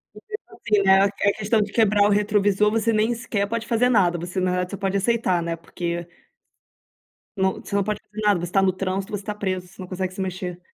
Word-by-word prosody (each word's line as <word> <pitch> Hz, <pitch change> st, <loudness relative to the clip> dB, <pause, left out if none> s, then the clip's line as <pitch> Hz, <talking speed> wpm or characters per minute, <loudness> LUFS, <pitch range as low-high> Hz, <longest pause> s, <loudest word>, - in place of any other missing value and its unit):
E -, -, -12 dB
mesmo 425 Hz, 0 st, -9 dB
assim, 210 Hz, -2 st, +1 dB
né, 190 Hz, 0 st, +6 dB
a -, -, +5 dB
a 200 Hz, 0 st, +1 dB
questão 215 Hz, +1 st, +1 dB
de 205 Hz, 0 st, -2 dB
quebrar 210 Hz, -2 st, +3 dB
o -, -, +4 dB
retrovisor, 205 Hz, 0 st, +2 dB
você 225 Hz, 0 st, +1 dB
nem 215 Hz, +2 st, +2 dB
sequer 225 Hz, -4 st, -2 dB
pode 230 Hz, +1 st, -3 dB
fazer 240 Hz, +1 st, +2 dB
nada. 180 Hz, -7 st, +3 dB
Você 175 Hz, +3 st, -4 dB
na 185 Hz, 0 st, +1 dB
realidade 180 Hz, 0 st, -1 dB
só 200 Hz, -, -4 dB
pode 195 Hz, 0 st, -1 dB
aceitar, 195 Hz, -4 st, +1 dB
né. 170 Hz, 0 st, -2 dB
Porque 170 Hz, +1 st, -5 dB, 1.3 s
Não, 190 Hz, 0 st, +2 dB
você -, -, -5 dB
não 200 Hz, -, +3 dB
pode 210 Hz, 0 st, -3 dB
fazer 215 Hz, 0 st, -9 dB
nada. 205 Hz, -3 st, +3 dB
Você 175 Hz, -, -8 dB
tá 195 Hz, +1 st, +3 dB
no 190 Hz, -1 st, +3 dB
trânsito, 190 Hz, +1 st, -3 dB
você 200 Hz, -, -6 dB
tá 210 Hz, -, -3 dB
preso, 185 Hz, -3 st, -3 dB
você 190 Hz, +1 st, -13 dB
não 185 Hz, -, -7 dB
consegue 185 Hz, 0 st, -3 dB
se 190 Hz, -, -5 dB
mexer. 180 Hz, -1 st, -4 dB
200 Hz, 240 wpm, -23 LUFS, 185-210 Hz, 1.3 s, né